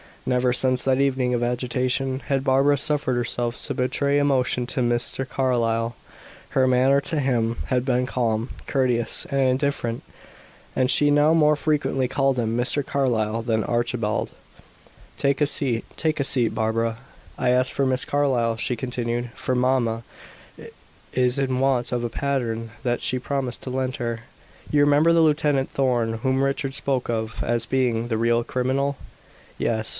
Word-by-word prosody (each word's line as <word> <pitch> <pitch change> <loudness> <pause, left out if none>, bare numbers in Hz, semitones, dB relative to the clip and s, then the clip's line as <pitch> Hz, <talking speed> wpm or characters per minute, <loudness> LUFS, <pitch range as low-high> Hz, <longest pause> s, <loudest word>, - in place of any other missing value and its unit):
Never, 125 0 +1
since 130 -1 +2
that 135 0 +2
evening 130 -2 +1
of 120 - 0
agitation, 125 +2 -1
had 135 -1 -1
Barbara 135 +2 +3
suffered 140 -2 0
herself 120 0 -2
to - - 0
betray 140 +3 0
emotion 130 -3 +1
to 130 - -3
Mr. 120 +2 -1
Carlyle; 115 -3 0 0.5
her 130 -1 +2
manner 130 +2 +3
to 155 +2 0
him 120 -4 0
had 125 -1 0
been 125 -1 +1
calm, 115 -2 -1 0.2
courteous, 125 -4 0
and 140 - 0
indifferent. 130 -3 0 0.7
And 130 -1 +1
she 145 - +3
now 145 +2 +4
more 150 -2 +4
frequently 145 -3 0
called 135 0 +1
him 115 -1 -1
"Mr. 130 +3 +1
Carlyle" 115 -5 0
than 110 -2 0
"Archibald." 120 -3 -1 0.9
"Take 140 +1 0
a 150 - +4
seat 125 -6 +2
take 160 -1 0
a - - +2
seat, 125 -4 +2
Barbara." 115 +1 -1 0.4
"I - - 0
asked 125 +1 +2
for 135 - 0
Miss 130 0 +3
Carlyle," 125 -6 +1
she 125 - -1
continued, 120 -1 -3
"for 130 - -2
mamma 125 -3 +1 1.1
is 125 +1 +1
in 130 -2 0
want 130 -2 +1
of 120 -1 -1
a 120 - -2
pattern 115 -4 -2
that 120 -2 -1
she 130 - 0
promised 130 -1 -3
to - - -5
lend 130 0 -2
her. 115 -2 -3 0.5
You 145 - +3
remember 145 +3 +4
the 165 - +4
Lieutenant 150 -3 +2
Thorn 120 -4 0
whom 130 +3 +1
Richard 135 0 -1
spoke 130 -3 -1
of 110 -1 -3
as 120 0 -1
being 120 -2 0
the 115 -2 -1
real 115 +1 +2
criminal?" 130 +3 -1 0.6
"Yes." 110 -1 -1
125 Hz, 160 wpm, -23 LUFS, 120-135 Hz, 1.1 s, now